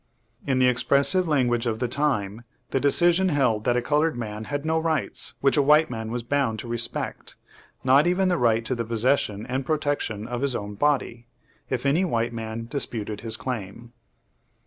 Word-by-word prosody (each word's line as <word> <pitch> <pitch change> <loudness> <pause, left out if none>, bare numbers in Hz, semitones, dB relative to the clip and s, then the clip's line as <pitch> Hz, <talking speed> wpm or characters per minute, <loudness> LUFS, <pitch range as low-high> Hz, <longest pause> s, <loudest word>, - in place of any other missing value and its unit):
In 135 -2 +1
the 130 - +4
expressive 140 +8 +2
language 120 -6 +1
of 110 -1 -1
the 125 +2 -1
time 120 -6 -1 0.3
the 135 - +1
decision 175 +6 +4
held 125 -8 +1
that 120 0 +2
a 120 - 0
colored 150 +1 +1
man 110 -2 -5
had 145 +5 -4
no 160 0 +1
rights 155 -8 -1
which 135 +2 +3
a - - +5
white 150 +2 +4
man 110 -2 -5
was 120 +1 -3
bound 130 -3 0
to 115 - -7
respect, 115 0 -3 0.5
not 135 +5 +5
even 185 +2 +2
the 180 -4 +1
right 115 -2 +2
to 130 - -1
the 120 -2 -2
possession 115 -2 0
and 130 +2 -2
protection 145 -8 -2
of 120 0 -4
his 140 -3 0
own 105 -1 -5
body, 120 -1 -1 0.4
if 130 0 -2
any 150 +7 +3
white 120 -9 -1
man 115 0 -5
disputed 115 -5 -4
his 110 -1 -2
claim. 120 -1 -6
125 Hz, 185 wpm, -25 LUFS, 115-145 Hz, 0.5 s, a